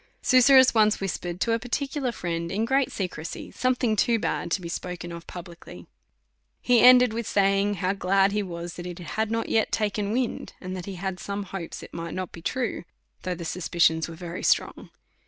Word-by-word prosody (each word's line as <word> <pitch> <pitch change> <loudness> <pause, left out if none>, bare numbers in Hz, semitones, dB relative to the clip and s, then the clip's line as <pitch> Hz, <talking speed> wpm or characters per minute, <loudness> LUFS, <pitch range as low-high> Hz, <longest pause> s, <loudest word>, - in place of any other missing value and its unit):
Susurrus 260 0 +6
once 215 -2 +4
whispered 180 -2 -4
to 230 - +1
a 230 - +2
particular 265 +2 -2
friend 170 -5 -4
in 210 +4 0
great 270 +2 +1
secrecy, 175 -4 -5
something 250 -3 +1
too 230 +2 +2
bad 210 - -2
to 180 - 0
be 175 - -7
spoke 180 +1 -5
of 170 -1 -8
pub 175 -1 -8
licly. 170 -1 -12 0.7
He 245 -1 +3
ended 250 -2 +7
with 230 -1 -3
saying, 200 +1 +2
how 185 +1 0
glad 195 +1 +2
he 210 +1 0
was, 170 -3 -6
that 175 0 -6
it 175 -1 -7
had 215 +5 -3
not 230 0 -1
yet 220 - +1
took 215 -2 0
wind, 220 +4 -2
and 185 0 -6
that 180 0 -7
he 195 - -5
had 185 0 -4
some 200 +2 -4
hopes 185 -3 -7
it - - -12
might 165 0 -5
not 185 -1 -4
be 165 - -10
true, 245 +4 -2 0.4
though 180 -1 -3
the 170 0 -7
suspicions 165 -1 +1
were 170 +1 -7
strong. - - 0
195 Hz, 195 wpm, -26 LUFS, 175-230 Hz, 0.7 s, ended